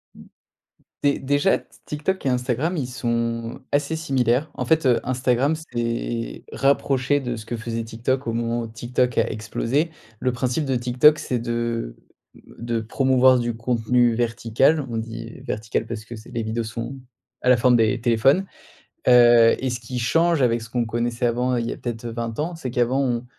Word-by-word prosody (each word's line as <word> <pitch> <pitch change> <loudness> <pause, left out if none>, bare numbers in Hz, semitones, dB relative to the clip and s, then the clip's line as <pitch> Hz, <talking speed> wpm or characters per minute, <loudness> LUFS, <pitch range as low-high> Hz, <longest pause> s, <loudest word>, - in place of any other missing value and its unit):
Mmh, - - -13 0.8
dé 140 0 +2
déjà 145 +7 +2
t - - -22 0.2
TikTok 155 +5 -3
et - - +3
Instagram 125 +7 0
ils 130 - -2
sont 115 -2 -2
assez 145 +2 0
similaires. 135 -2 +1
En - - -4
fait, 160 -3 +2
heu, 125 -2 +4
Instagram 130 +3 +1
s'est 120 -5 -4
rapproché 135 0 +1
de 120 -3 -3
ce 110 -1 -9
que 120 - -4
faisait 115 +1 -4
TikTok 120 +3 -2
au 115 - -1
moment 115 +1 -1
ou 115 - -5
TikTok 120 +2 -1
a - - +2
explosé. 115 +8 -1 0.3
Le 130 0 0
principe 125 +4 -1
de 135 -2 0
TikTok 125 +5 +4
c'est 125 - -2
de 120 0 -3 0.4
de 115 0 -5
promouvoir 130 +2 +3
du 120 -1 -2
contenu 120 0 +2
vertical. 120 +5 +1
On 115 - -3
dit 115 +1 -7
vertical 110 +1 -3
parce 110 -2 -6
que 120 - -8
c'est 110 +1 -12
les 115 - -2
vidéos 110 +1 -2
sont 115 +4 -5 0.5
à 125 - +1
la 125 - +6
forme 125 +1 +4
des 115 +2 +2
téléphones. 125 +10 +3 0.6
Heu, 120 -2 +7
et 130 - -1
ce 120 - -3
qui 125 +2 -5
change 165 +5 +2
avec 120 -2 +2
ce 115 - -10
qu'on 120 -1 0
connaissait 120 +1 -1
avant 125 +2 +1
il 115 -1 -1
y - - -2
a - - -6
peut-être, 120 -1 -5
heu, 115 - -4
20 115 -1 -4
ans 165 +3 -2
c'est 135 -6 -5
qu'avant 125 +3 +1
on 120 -2 -1
120 Hz, 185 wpm, -23 LUFS, 115-130 Hz, 0.8 s, Heu